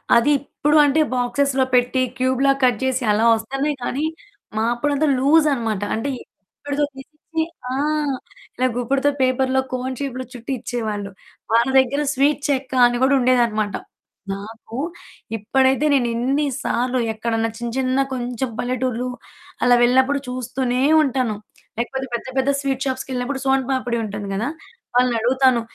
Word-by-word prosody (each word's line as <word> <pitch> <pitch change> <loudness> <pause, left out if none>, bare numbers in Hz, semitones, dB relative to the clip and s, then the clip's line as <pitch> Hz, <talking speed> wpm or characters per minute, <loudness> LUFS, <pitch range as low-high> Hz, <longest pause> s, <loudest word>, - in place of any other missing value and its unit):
అది 235 +5 +4
ఇప్పుడు 295 +2 0
అంటే 290 +2 +3
బాక్స్‌లో 260 +2 +1
పెట్టి 250 +1 +2 0.2
క్యూబ్‌లాగా 265 +2 +2
కట్ 245 -4 +2
చేసి 260 0 0
అలా 220 +2 +2
వస్తున్నాయి 270 +6 -2
కానీ, 280 +5 -1 0.5
మా 220 - +1
అప్పుడంతా 290 +4 0
లూజ్ 305 +3 +4
అనమాట. 225 -5 -2
అంటే 225 +6 -2
గుప్పిడతో 285 +8 -5
తీసిచ్చి 305 +4 -5 0.3
ఆ! - - -1 0.8
ఇలా 255 - +2
గుప్పడతో 270 +4 +1
పేపర్‌లో 260 +1 +2
కోన్ 255 0 -3
షేప్‌లో 260 -2 -4
చుట్టి 245 +1 -7
ఇచ్చేవాళ్ళు. 215 -4 -4 0.4
వాళ్ళ 235 +2 +4
దగ్గర 265 +3 +1
స్వీట్ 285 +1 +2
చెక్క 270 -2 -1 0.2
అని 240 0 -1
గూడా 275 +1 +4
ఉండేదనమాట. 235 -5 +2 0.6
నాకు 220 +3 -9 0.6
ఇప్పుడైతే 265 +6 +2
నేనెన్ని 255 +3 +1 0.2
సార్లు 250 +1 0
ఎక్కడైనా 225 0 -1
చిన్న, 235 0 -4
చిన్న, 260 0 +1 0.2
కొంచెం 250 0 -3
పల్లెటూర్లు 250 0 -1 0.6
అలా 245 0 +6
వెళ్ళినప్పుడు 260 +3 +3
చూస్తూనే 250 0 -2 0.2
ఉంటాను. 255 -5 0 0.4
లేకపోతే 265 +3 -2
పెద్ద 235 - -3
పెద్ద 265 +1 +2
స్వీట్ 270 -1 -2
షాప్స్‌కెళ్ళినప్పుడు 260 0 -3
సోను 265 -1 +2
పాపిడి 245 -3 -1
ఉంటుంది 205 -1 -5
గదా! 220 +7 -1 0.5
వాళ్ళనడుగుతాను. 250 +1 +3
255 Hz, 130 wpm, -21 LUFS, 235-270 Hz, 0.8 s, అలా